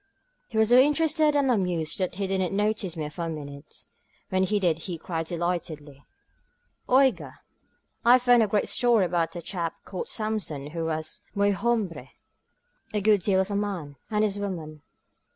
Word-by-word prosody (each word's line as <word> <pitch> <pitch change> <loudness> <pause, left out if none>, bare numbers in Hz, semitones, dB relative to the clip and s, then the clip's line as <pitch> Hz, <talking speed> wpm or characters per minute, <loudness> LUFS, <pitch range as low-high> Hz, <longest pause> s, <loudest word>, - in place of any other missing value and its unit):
He 220 - -5
was 220 0 +4
so 245 +1 +7
interested 300 +2 +3
and 275 -2 +3
amused 180 -8 0
that 185 -1 -1
he 200 +1 -2
didn't 190 -1 -1
notice 205 -4 0
me 155 -2 -3
for 170 +3 -5
a - - -3
minute. 145 -2 -8 0.5
When 185 0 +1
he 210 +2 +1
did 170 -4 +1
he 175 0 -5
cried 165 0 -4
delightedly: 160 -5 -4 0.9
Oiga^ 245 - +3 0.7
I 240 0 +7
have 250 -1 +4
found 245 -1 +6
a 220 - +3
great 205 0 0
story 235 -5 +3
about 170 0 -1
a 170 - -6
chap 170 -3 -3
called 185 - -5
Samson 200 -10 -3
who 165 0 -3
was 155 -1 -4
muy 200 0 +3
hombre 195 - -1 0.4
— - - -25
a - - +2
good 210 -1 +4
deal 190 +1 +2
of 190 +2 -3
a - - -1
man— 190 -8 -3
= - - -45
and 210 0 +1
his 205 -1 0
woman. 160 -7 -5
190 Hz, 185 wpm, -26 LUFS, 165-215 Hz, 0.9 s, so